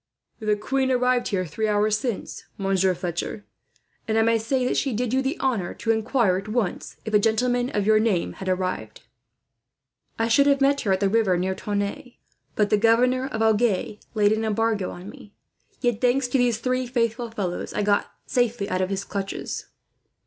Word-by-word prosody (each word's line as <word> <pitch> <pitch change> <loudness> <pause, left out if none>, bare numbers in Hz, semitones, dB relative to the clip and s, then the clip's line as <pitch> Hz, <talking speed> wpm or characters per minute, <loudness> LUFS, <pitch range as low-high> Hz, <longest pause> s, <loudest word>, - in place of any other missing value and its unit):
"The 215 -2 +1
queen 265 +5 -1
arrived 250 -1 +2
here 185 -3 -1
three 215 +8 -2
hours 210 0 +2
since, 225 0 -4
Monsieur 195 -1 +1
Fletcher; 180 +4 -4 0.6
and 220 0 +1
I 225 - +4
may 230 0 +3
say 250 +3 0
that - - 0
she 270 -3 0
did 240 +2 -1
you 265 - +3
the 270 +5 -2
honour 230 -10 -1
to 225 - 0
inquire, 220 -3 +2
at 195 +2 -6
once, 215 -4 -2
if 220 - -5
a 210 - +6
gentleman 245 +3 +1
of 205 -5 -1
your 215 0 +5
name 215 -6 0
had 190 - -5
arrived." 185 0 -2 1.2
"I 225 - +1
should 280 +5 +4
have 280 -1 +4
met 280 +1 +3
her 200 - 0
at 190 +1 +1
the 200 - +3
river 200 -3 +2
near 185 +2 0
Tonneins, 205 +5 -3 0.4
but 210 -1 +1
the 210 - +5
governor 250 +4 +3
of 225 -4 -2
Agen 215 -2 +1 0.2
laid 205 -1 +4
an 220 +1 0
embargo 220 -2 0
on 180 +2 -9
me. 205 0 -13 0.5
Yet, 240 -3 0
thanks 250 +1 +2
to 265 - +1
these 240 -3 +2
three 255 +1 -1
faithful 235 -1 -1
fellows, 195 -6 -4
I 210 - -1
got 205 0 +1
safely 240 -4 0
out 185 - 0
of 185 - 0
his 195 0 -2
clutches." 195 -1 -5
220 Hz, 190 wpm, -24 LUFS, 200-245 Hz, 1.2 s, a